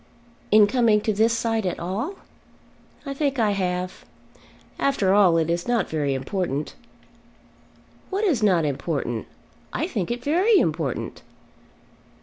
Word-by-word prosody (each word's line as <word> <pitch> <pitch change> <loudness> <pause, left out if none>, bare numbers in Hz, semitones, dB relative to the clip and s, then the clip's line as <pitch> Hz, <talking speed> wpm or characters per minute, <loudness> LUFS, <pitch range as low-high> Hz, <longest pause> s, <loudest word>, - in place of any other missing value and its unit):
"In 215 0 +7
coming 225 -1 +3
to 215 - 0
this 220 +3 +3
side 225 -1 0
at 180 - -2
all?" 215 - -3 0.9
"I 275 - -4
think 275 -1 -1
I 220 -3 +2
have. 180 -2 -2 0.8
After 205 -9 +2
all 190 -5 +5
it 160 -1 +1
is 170 +3 -2
not 240 -1 0
very 145 -3 0
important." 150 +1 -3 1.4
"What 395 +2 -2
is 320 - +2
not 180 -6 +3
important? 140 - -3 0.4
I - - -1
think 175 - -3
it 240 +1 -3
very 370 - +3
important." - - -1
205 Hz, 130 wpm, -24 LUFS, 170-245 Hz, 1.4 s, In